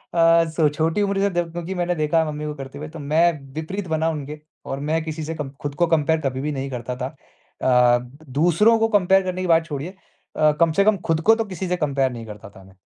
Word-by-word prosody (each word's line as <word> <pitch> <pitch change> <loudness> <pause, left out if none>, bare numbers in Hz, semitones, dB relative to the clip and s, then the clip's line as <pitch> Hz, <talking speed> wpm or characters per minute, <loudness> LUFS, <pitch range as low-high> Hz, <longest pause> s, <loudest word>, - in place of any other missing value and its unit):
अ, 165 0 +5
स 160 -1 +1
छोटी 160 +6 +1
उम्र 200 -1 0
से 200 - +2
द 175 - 0
क्योंकि 175 +2 -5
मैंने 175 0 -1
देखा 155 +1 +1
है 160 - +1
मम्मी 150 0 -5
को 150 - -3
करते 135 -1 -9
हुए 150 - -6
तो 165 - -10
मैं 150 -1 +1
विपरीत 180 +5 -4
बना 160 +1 +1
उनके 150 -1 -5 0.3
और 135 - -4
मैं 160 0 +1
किसी 160 0 -5
से 160 +2 -4
कम 150 -3 -5
खुद 145 -1 -4
को 175 +2 +2
कंपेयर 160 0 +2
कभी 130 -2 -2
भी 150 +2 -2
नहीं 135 0 -4
करता 125 0 -4
था। 130 0 -3
अ, 125 -3 0
द 130 +6 -14
दूसरों 175 +9 +4
को 225 - +3
कंपेयर 190 0 +3
करने 185 0 -3
की 185 - -2
बात 165 -1 +4
छोड़िए, 150 +4 -5 0.4
अ, 155 0 +4
कम 165 -1 +5
से 200 +4 +3
कम 215 -1 +4
खुद 165 -1 +1
को 225 - +8
तो 225 0 -2
किसी 190 -2 -5
से 180 0 0
कंपेयर 140 -4 0
नहीं 115 -2 -7
करता 105 -1 -10
था 95 - -16
मैं। 95 0 -19
160 Hz, 255 wpm, -22 LUFS, 140-175 Hz, 0.4 s, को